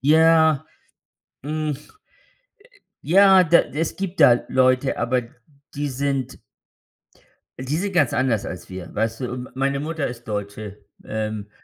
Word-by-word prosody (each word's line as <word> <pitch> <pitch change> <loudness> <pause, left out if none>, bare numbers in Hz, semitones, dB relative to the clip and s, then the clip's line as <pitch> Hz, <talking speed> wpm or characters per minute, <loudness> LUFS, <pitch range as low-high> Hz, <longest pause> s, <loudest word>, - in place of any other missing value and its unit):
ja. 160 +1 +4 0.8
Hm, 155 +1 -3
äh, - - -6 1.3
ja, 190 +4 +6
da 170 +1 +5
es 160 +3 -4
gibt 190 -3 -5
da 120 -5 +6
Leute, 130 +1 +2
aber 125 +2 0 0.5
die 145 +1 -2
sind 135 -1 -3 1.2
die 130 +4 -2
sind 195 +4 -2
ganz 145 -9 +2
anders 120 -4 0
als 90 - -8
wir, 95 -1 -8
weißt 115 0 -2
du, 125 - -3
und 125 0 -6
m - - -17
meine 135 +1 0
Mutter 155 -1 -3
ist 120 -1 -8
Deutsche. 105 0 -6 0.2
Ähm, 110 -1 -4
135 Hz, 140 wpm, -22 LUFS, 115-155 Hz, 1.3 s, ja